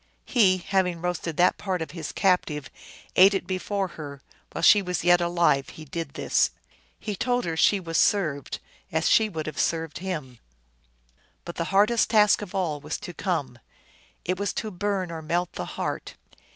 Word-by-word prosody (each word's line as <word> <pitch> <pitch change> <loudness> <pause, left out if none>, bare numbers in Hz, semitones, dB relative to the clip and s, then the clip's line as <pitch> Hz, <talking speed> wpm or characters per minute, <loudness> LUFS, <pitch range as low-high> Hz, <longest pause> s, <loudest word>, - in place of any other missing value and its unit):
He, 195 -7 +4
having 180 -1 0
roasted 175 -2 -3
that 180 +1 +3
part 190 -3 -2
of 160 - -5
his 165 -4 -6
captive, 155 -7 0 0.4
ate 195 +2 +7
it 195 - -2
before 190 +1 -2
her; 145 -4 -8 0.3
while - - -5
she 205 - +7
was 180 -3 -3
yet 175 0 +5
alive 170 -5 +2
he 155 - -11
did 160 -1 -6
this. - - +2 0.5
He 210 -2 -4
told 245 +3 0
her 165 -1 -2
she 200 +5 +4
was 165 -3 -1
served 155 -9 +1 0.3
as 160 0 +1
she 220 -1 +4
would 160 -5 -5
have 155 - -5
served 165 -2 -1
him. 150 -10 -5 1.1
But 170 - -7
the 170 - -1
hardest 210 +5 +3
task 210 -2 +5
of 200 -1 -7
all 165 -6 -1
was 150 +3 -4
to 175 - -8
come. 145 -11 -3 0.7
It 185 +1 -1
was 200 - -1
to 215 - -4
burn 190 -1 -2
or 165 -1 -6
melt 170 +3 -1
the 90 - -4
heart. - - -4
175 Hz, 180 wpm, -26 LUFS, 160-195 Hz, 1.1 s, ate